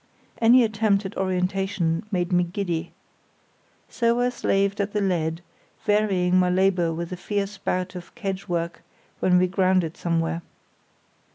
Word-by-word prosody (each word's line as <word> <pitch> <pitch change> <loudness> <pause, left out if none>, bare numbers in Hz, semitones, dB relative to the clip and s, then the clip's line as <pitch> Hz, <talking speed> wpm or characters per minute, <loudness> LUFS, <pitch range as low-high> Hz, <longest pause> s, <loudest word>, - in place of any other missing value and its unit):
Any 240 +2 +7
attempt 215 -2 +1
at 190 - -6
orientation 185 -2 0
made 180 -2 -1
me 180 0 +4
giddy. 175 -2 -3 1.0
So 235 0 +1
I 245 - +2
slaved 200 -4 0
at 200 +1 -3
the 210 - +1
lead, 170 -4 0 0.4
varying 195 -4 +2
my 180 0 +3
labour 180 -2 +2
with 170 +2 -5
a - - -3
fierce 200 +1 -3
bout 185 -1 -2
of 180 +3 -10
kedge 195 -4 -4
work 170 -1 -2 0.4
when 180 -1 +4
we 180 - +4
grounded 185 -3 +1
somewhere. 165 0 -1
185 Hz, 145 wpm, -24 LUFS, 175-200 Hz, 1.0 s, Any